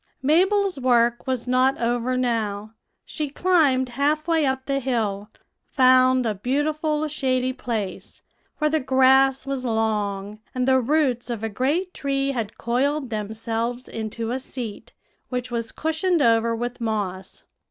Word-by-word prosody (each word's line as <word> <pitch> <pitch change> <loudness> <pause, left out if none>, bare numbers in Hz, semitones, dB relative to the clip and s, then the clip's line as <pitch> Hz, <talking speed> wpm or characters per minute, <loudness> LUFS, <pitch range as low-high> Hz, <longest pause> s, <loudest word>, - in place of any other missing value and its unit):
"Mabel's 375 +4 +2
work 240 -2 +2
was 255 -2 -2
not 255 +2 +2
over 240 +2 0
now; 220 -4 -2 0.3
she 300 -2 -4
climbed 290 -6 +2
half 295 +5 0
way 325 -4 +2
up 265 0 -2
the 275 -1 0
hill, 220 -6 -2 0.4
found 255 -1 +4
a 220 - 0
beautiful 300 +7 -1
shady 260 -3 -1
place, 215 -7 -5 0.3
where 305 -1 +1
the 315 - +2
grass 265 0 +4
was 275 -2 -3
long, 210 -3 -1 0.2
and 255 0 0
the 260 0 +5
roots 255 -2 +1
of 230 -2 -4
a 225 - -1
great 295 - -1
tree 275 -1 -1
had 230 -4 -4
coiled 265 +3 -1
themselves 225 +3 -3
into 225 +1 -4
a 255 - -1
seat, 245 -5 -7 0.4
which 250 -1 -3
was 230 -1 -2
cushioned 320 +3 0
over 230 0 +3
with 240 +1 -5
moss. 200 -4 -3
255 Hz, 140 wpm, -23 LUFS, 230-275 Hz, 0.4 s, the